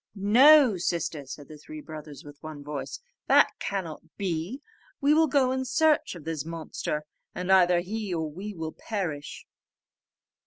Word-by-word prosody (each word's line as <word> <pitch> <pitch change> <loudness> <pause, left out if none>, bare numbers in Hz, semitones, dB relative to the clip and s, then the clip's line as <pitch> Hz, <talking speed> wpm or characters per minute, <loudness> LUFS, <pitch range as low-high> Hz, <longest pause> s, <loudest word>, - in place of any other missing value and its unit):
"No, 245 +4 +6
sister," 165 -5 -2
said 145 +2 -9
the 155 -1 -12
three 310 - -9
brothers 150 - -9
with 145 -1 -13
one 155 -2 -8
voice, 150 - -5 0.3
"that - - +6
cannot 180 -6 -4 0.2
be; 185 - -3 0.4
we 285 +2 +4
will 320 +1 +4
go 260 -2 +3
in 260 0 -1
search 295 - +2
of 165 - -10
this 160 -2 -3
monster, 155 -2 -4 0.3
and 180 +1 -2
either 180 -2 +5
he 210 +2 -4
or 160 -2 -1
we 190 +7 -7
will 160 -1 -4
perish." 175 -10 -5
180 Hz, 155 wpm, -27 LUFS, 155-235 Hz, 0.4 s, No